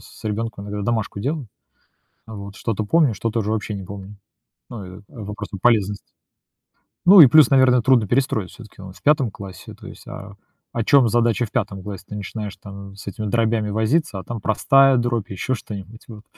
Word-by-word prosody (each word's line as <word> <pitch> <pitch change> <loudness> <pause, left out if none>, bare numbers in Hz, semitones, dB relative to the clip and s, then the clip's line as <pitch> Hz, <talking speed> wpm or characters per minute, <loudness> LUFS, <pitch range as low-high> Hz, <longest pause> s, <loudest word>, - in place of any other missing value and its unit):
с - - -17
ребенком 105 -1 -3
иногда 105 0 -4
домашку 110 -2 -2
делаю, 140 +1 -3 0.8
вот. 100 -2 -9
Что-то 110 -2 -3
помню, 150 0 +3
что-то 115 +2 -2
уже 105 -1 -2
вообще 110 -1 -2
не 95 - -6
помню. 100 +2 -10 0.5
Ну, 95 -5 -9
и - - -16
вопрос, 105 -1 -7
там, 100 - -7
полезности. 105 -4 +2 1.0
Ну 185 0 +10
и 140 - +10
плюс, 155 +3 +6
наверно, 130 -2 +5
трудно 120 -4 +3
перестроить, 120 -7 0
все-таки 110 -4 -14
он 95 -1 -10
в - - -19
5 140 -6 +2
классе. 95 -2 -10
То - - -13
есть, - - -12
а, 100 +1 -9 0.4
о 115 - -1
чем 135 -2 +5
задача 120 +1 +2
в - - -22
5 100 -6 -2
классе? 100 -2 -7
Ты - - -6
начинаешь, 105 0 -6
там, 100 0 -11
с 100 - -12
этими 105 +3 -5
дробями 110 -1 0
возиться, 110 - 0
а - - -8
там 115 +2 -6
простая 135 +5 +4
дробь, 120 -3 -1
еще 100 +7 -2
что-нибудь, 105 -1 -9
вот. 110 -1 -11
110 Hz, 190 wpm, -21 LUFS, 100-120 Hz, 1.0 s, Ну